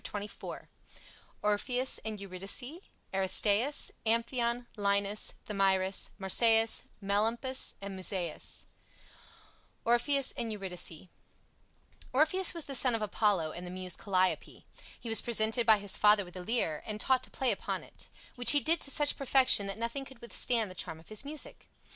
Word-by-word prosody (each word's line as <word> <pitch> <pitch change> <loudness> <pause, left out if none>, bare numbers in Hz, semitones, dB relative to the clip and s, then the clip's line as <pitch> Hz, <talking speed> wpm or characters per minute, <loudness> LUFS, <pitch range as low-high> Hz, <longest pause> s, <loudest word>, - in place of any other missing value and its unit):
CHAPTER - - -5
XXIV - - -9 0.8
ORPHEUS 245 +5 0
AND 220 -2 -5
EURYDICE 200 - -2 0.3
ARISTAEUS 205 +7 +2 0.2
AMPHION 235 +1 0
LINUS 200 0 0
THAMYRIS 195 -2 0
MARSYAS 225 +3 +3 0.2
MELAMPUS 225 +6 0
MUSAEUS 190 -2 -2 1.2
ORPHEUS 260 +4 +2
AND 235 -4 -5
EURYDICE 185 -4 -4 1.1
Orpheus 340 +7 +3
was 335 - -5
the 275 - -7
son 250 -2 +7
of 220 - -3
Apollo 200 -6 0
and 175 +3 -8
the - - -7
Muse 185 0 -1
Calliope. 185 -5 -2 0.3
He - - -10
was 225 -2 +6
presented 230 0 +2
by 220 -1 +7
his 200 -1 +1
father 210 -1 +5
with 175 - -15
a 180 - -7
Lyre 180 -8 -1
and 215 -1 -5
taught 260 +3 +1
to - - -15
play 260 -2 -1
upon - - -4
it, - - -9 0.2
which 245 +1 +5
he 290 - +6
did 325 +4 +2
to - - -2
such 290 +1 +2
perfection 260 -6 +3
that 195 - -5
nothing 235 +4 -4
could 265 -1 -13
withstand 235 -3 0
the - - -9
charm 160 -2 -6
of 160 - -19
his 215 +3 -4
music. 290 +1 -7
220 Hz, 150 wpm, -30 LUFS, 195-250 Hz, 1.2 s, son